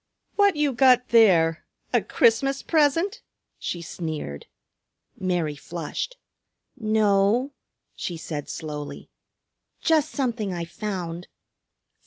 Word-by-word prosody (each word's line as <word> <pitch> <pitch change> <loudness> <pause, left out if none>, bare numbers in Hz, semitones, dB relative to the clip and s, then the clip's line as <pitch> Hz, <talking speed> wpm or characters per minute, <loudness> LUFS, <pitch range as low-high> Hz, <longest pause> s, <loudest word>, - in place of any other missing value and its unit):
"What 405 -3 +4
you 295 -2 +1
got 250 0 +5
there? 175 -8 +5 0.3
A - - +4
Christmas 270 +4 +2
present?" 330 - +2 0.4
she 175 -1 -4
sneered. 155 - -5 0.7
Mary 175 -5 0
flushed. 170 - -5 0.6
"No," 215 +2 +2 0.4
she 175 - -5
said 150 -3 -5
slowly, 150 -2 -6 0.7
"just 310 -2 +2
something 240 -9 -2
I 170 -1 -3
found." 180 -2 -5
210 Hz, 95 wpm, -25 LUFS, 170-275 Hz, 0.7 s, got